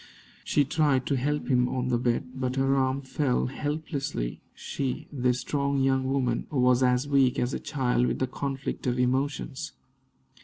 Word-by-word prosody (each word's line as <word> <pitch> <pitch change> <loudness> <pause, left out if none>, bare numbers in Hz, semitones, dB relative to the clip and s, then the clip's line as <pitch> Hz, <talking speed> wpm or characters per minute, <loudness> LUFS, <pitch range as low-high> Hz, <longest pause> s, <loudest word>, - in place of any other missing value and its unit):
She 145 - +2
tried 140 -3 +2
to 140 - +1
help 145 +3 -1
him 125 -2 +3
up - - -3
on 125 0 -1
the 120 -1 +2
bed, 125 +1 0
but 130 -1 -2
her 135 0 +2
arms 135 0 0
fell 135 -2 +1
helplessly 145 - -3
she, 135 -2 -4
this 125 -2 0
strong 140 0 0
young 135 0 +2
woman, 125 -4 0
was 125 -3 +3
as 125 +1 +2
weak 135 -3 +3
as 125 +2 0
a - - -2
child 125 -4 0
with - - -1
the 130 - +1
conflict 135 0 -4
of 125 0 +1
emotions. 135 +3 -1
130 Hz, 175 wpm, -27 LUFS, 125-140 Hz, -, him